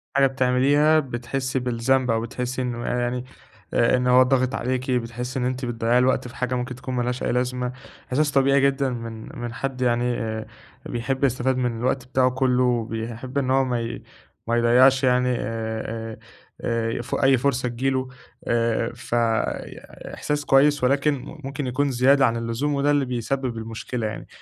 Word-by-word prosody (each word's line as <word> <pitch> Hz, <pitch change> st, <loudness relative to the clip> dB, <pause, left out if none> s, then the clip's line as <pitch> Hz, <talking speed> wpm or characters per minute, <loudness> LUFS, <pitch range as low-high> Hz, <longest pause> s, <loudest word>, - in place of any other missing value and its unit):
حاجة 140 Hz, -1 st, +5 dB
بتعمليها 135 Hz, +4 st, +3 dB
بتحسي 130 Hz, 0 st, -3 dB
بالذنب، 125 Hz, +1 st, +1 dB
أو 115 Hz, 0 st, +1 dB
بتحسي 125 Hz, +2 st, -3 dB
إنه 120 Hz, -1 st, -3 dB
آآ 125 Hz, -, -1 dB
يعني 120 Hz, +1 st, -2 dB, 0.5 s
آآ 120 Hz, +2 st, +3 dB
إن 125 Hz, 0 st, 0 dB
هو 125 Hz, +1 st, +7 dB
ضاغط 130 Hz, 0 st, +1 dB
عليكِ، 130 Hz, +1 st, -2 dB
بتحسي 125 Hz, +1 st, -2 dB
إن 125 Hz, -, 0 dB
أنتِ 130 Hz, 0 st, -2 dB
بتضّيعي 120 Hz, 0 st, +1 dB
الوقت 125 Hz, 0 st, +2 dB
في 120 Hz, -, -12 dB
حاجة 125 Hz, -2 st, -1 dB
ممكن 125 Hz, +1 st, -3 dB
تكون 130 Hz, 0 st, -5 dB
ما 120 Hz, -, 0 dB
لهاش 125 Hz, +1 st, -2 dB
أي -, -, 0 dB
لازمة. 125 Hz, 0 st, -1 dB, 0.4 s
احساس 145 Hz, +3 st, +1 dB
طبيعي 140 Hz, 0 st, +4 dB
جدًا 135 Hz, 0 st, +2 dB
من 115 Hz, -2 st, -7 dB
من 120 Hz, -1 st, -4 dB
حد 130 Hz, +2 st, -4 dB
يعني 120 Hz, 0 st, +1 dB
آآ 110 Hz, -1 st, -3 dB, 0.4 s
بيحب 130 Hz, +3 st, -3 dB
يستفاد 130 Hz, 0 st, +1 dB
من 120 Hz, -3 st, -1 dB
الوقت 130 Hz, +1 st, -1 dB
بتاعه 130 Hz, 0 st, +3 dB
كلّه 130 Hz, -1 st, +2 dB
وبيحب 120 Hz, +1 st, -2 dB
إن 130 Hz, -2 st, +1 dB
هو 135 Hz, 0 st, +4 dB
ما 125 Hz, -2 st, -1 dB
ي 115 Hz, 0 st, -5 dB, 0.4 s
ما 115 Hz, -, +1 dB
يضّيعش 130 Hz, +3 st, +5 dB
يعني 125 Hz, 0 st, +3 dB
آآ 110 Hz, 0 st, -4 dB, 0.4 s
آآ 115 Hz, -1 st, -1 dB
آآ -, -, -2 dB
ف 120 Hz, -, -4 dB
أي 135 Hz, -1 st, +4 dB
فرصة 125 Hz, -1 st, 0 dB
تيجي 125 Hz, +3 st, -1 dB
له، 130 Hz, -1 st, -1 dB, 0.4 s
آآ 115 Hz, 0 st, +1 dB
فإحساس 120 Hz, +5 st, -3 dB
كويس، 145 Hz, +1 st, +4 dB
ولكن 140 Hz, +3 st, +3 dB, 0.3 s
ممكن 135 Hz, 0 st, -4 dB
يكون 140 Hz, +3 st, 0 dB
زيادة 135 Hz, +2 st, +4 dB
عن 115 Hz, -1 st, +1 dB
اللزوم 115 Hz, +6 st, -1 dB
وده 140 Hz, +1 st, +2 dB
اللي 145 Hz, -2 st, +2 dB
بيسبب 125 Hz, 0 st, -2 dB
المشكلة 115 Hz, +1 st, -4 dB
يعني. 105 Hz, -, -7 dB
125 Hz, 175 wpm, -24 LUFS, 120-135 Hz, 0.5 s, هو